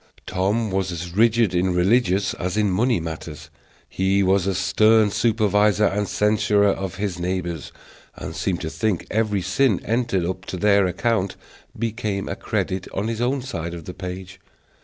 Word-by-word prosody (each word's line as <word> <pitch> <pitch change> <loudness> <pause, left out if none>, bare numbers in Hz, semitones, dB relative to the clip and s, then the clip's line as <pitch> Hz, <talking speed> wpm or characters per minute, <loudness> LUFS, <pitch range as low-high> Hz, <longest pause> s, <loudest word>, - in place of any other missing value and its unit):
Tom 100 +4 0
was 95 -1 -1
as 85 +1 -6
rigid 115 -2 +3
in 90 0 +1
religious 95 +1 +2
as 90 +2 -3
in 105 -2 +2
money 115 +3 +2
matters; 80 -2 -7 0.4
he 95 +1 +1
was 95 0 +2
a 95 - 0
stern 110 +3 +4
supervisor 105 -2 +2
and 105 +1 0
censurer 105 0 +2
of 95 -1 -3
his 100 -3 -3
neighbors, 85 -3 -3 0.4
and - - -7
seemed 90 -3 -2
to 80 - -3
think 90 +3 -1
every 105 -3 0
sin 95 +3 +2
entered 115 -5 0
up 95 +1 -4
to 95 - -5
their 100 0 +4
account 100 0 -1 0.4
became 110 -3 -2
a - - -3
credit 95 -1 -2
on 100 +4 -1
his 115 0 -3
own 130 +2 0
side 85 -10 -5
of 85 -2 -9
the 90 - -7
page. 95 +1 -7
100 Hz, 165 wpm, -22 LUFS, 90-110 Hz, 0.4 s, stern